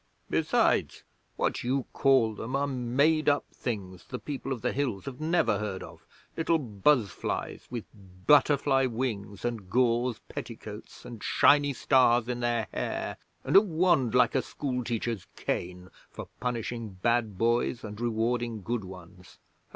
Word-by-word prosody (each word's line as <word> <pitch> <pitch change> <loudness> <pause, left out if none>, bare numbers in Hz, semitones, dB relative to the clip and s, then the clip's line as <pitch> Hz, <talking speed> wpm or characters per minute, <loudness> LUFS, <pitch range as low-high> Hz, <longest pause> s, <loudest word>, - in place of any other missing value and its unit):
Besides, - - +1 0.3
what - - -1
you 130 +1 0
call 130 -5 +3
them 115 +5 -5
are 140 +1 +1
made 140 +4 +2
up 145 0 +1
things 95 -6 -5
the 125 - -5
People 135 0 -5
of 120 -4 -3
the 125 - +1
Hills 130 -9 -2
have 135 0 -7
never 155 -10 +2
heard 105 -3 -4
of - - -13 0.3
little 165 0 +2
buzzflies 115 - 0
with 120 -3 -5 0.4
butterfly 140 -2 +4
wings 110 -5 -4
and 115 -6 -3
gauze 120 +1 +2
petticoats, - - -8
and 120 -3 -9
shiny 145 0 +4
stars 120 -2 +3
in 125 -1 -2
their 120 -3 0
hair, - - -3 0.3
and - - -1
a 195 - +11
wand 165 - +2
like 125 - +4
a 130 - +2
schoolteacher's 120 -6 -3
cane 90 +1 -4 0.2
for - - -9
punishing 115 -4 -4
bad 115 -4 +1
boys 120 +2 +1
and 105 +1 -7
rewarding 115 -1 -1
good 115 +2 -2
ones. 90 -1 -12
120 Hz, 145 wpm, -28 LUFS, 110-135 Hz, 0.4 s, a